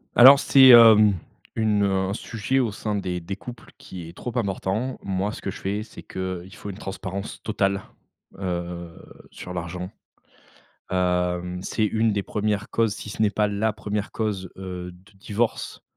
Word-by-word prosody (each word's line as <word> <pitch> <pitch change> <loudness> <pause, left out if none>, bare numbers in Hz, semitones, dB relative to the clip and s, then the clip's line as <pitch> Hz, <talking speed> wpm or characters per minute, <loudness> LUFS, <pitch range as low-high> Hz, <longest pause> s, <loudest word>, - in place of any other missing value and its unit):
Alors 135 +3 +10
c'est, 135 -1 +7
hem, 110 -3 +9 0.4
une, 105 -2 +2
heu, 100 - +2 0.2
un - - -1
sujet 115 +4 -2
au 120 -4 +1
sein 105 +1 -3
des 90 -3 -2
des 95 +3 -5
couples 120 +2 -11
qui 90 -3 -9
est - - -12
trop 120 -1 -6
important. 105 +4 -2
Moi 95 +1 -1
ce - - -8
que 100 - -3
je - - -10
fais, 100 +2 -2
c'est 110 - -12
qu'il 95 -1 -5
faut 105 -1 -8
une 95 - -10
transparence 95 0 -6
totale, 100 -2 0 0.6
heu, 85 -2 -4 0.4
sur 90 - -8
l'argent. 90 +2 -5 1.0
Hem, 90 0 0
c'est 110 +3 -1
une 110 +1 +1
des 100 -1 -1
1res 105 -1 -1
causes 115 -2 +1
si 105 - -8
ce 110 - -2
n'est 105 - +4
pas 105 0 +1
la 105 +2 0
1re 105 -1 -4
cause, 100 -5 -3
heu, 90 -1 -6
de 95 +4 -20
divorce, 110 +4 -2
100 Hz, 175 wpm, -24 LUFS, 95-110 Hz, 1.0 s, Alors